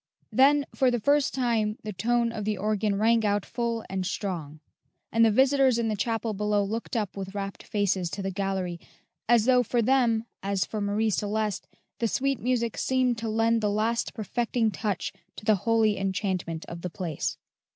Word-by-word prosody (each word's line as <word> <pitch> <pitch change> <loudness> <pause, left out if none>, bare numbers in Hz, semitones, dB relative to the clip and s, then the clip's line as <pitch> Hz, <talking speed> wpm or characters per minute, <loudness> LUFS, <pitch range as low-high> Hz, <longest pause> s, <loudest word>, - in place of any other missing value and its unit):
Then 285 +2 +5
for 260 - +3
the 240 -1 0
first 285 +5 +3
time 230 -5 0
the 215 0 -5
tone 235 +5 +1
of 215 -2 -5
the 210 0 -1
organ 210 0 0
rang 225 +2 +3
out 205 -1 +1
full 235 -2 -2
and 190 -1 -2
strong; 175 -6 -4 0.5
and 230 0 +4
the 225 - +6
visitors 265 +2 +4
in 230 -1 0
the 215 - 0
chapel 225 +1 -1
below 210 0 +1
looked 225 +4 -3
up 210 -4 -2
with 195 0 -6
rapt 195 -1 -4
faces 195 -4 0
to 195 +3 -5
the 195 - -2
gallery, 190 -2 -2 0.5
as 235 -2 +5
though 250 -1 +5
for 245 +1 0
them, 235 -3 +2 0.2
as 195 -2 0
for 215 - -4
Marie 210 +2 +1
Celeste, 210 0 -1 0.3
the 230 - +1
sweet 275 +2 0
music 235 -2 -1
seemed 255 -3 +1
to 225 0 -3
lend 225 +1 +2
the 210 - +1
last 220 +3 0
perfecting 225 +1 0
touch 205 -3 -3 0.2
to - - -10
the 215 - +5 0.2
holy 220 -3 +3
enchantment 190 -4 -2
of 170 0 -8
the 180 - -3
place. 170 -4 -3
215 Hz, 185 wpm, -27 LUFS, 200-235 Hz, 0.5 s, the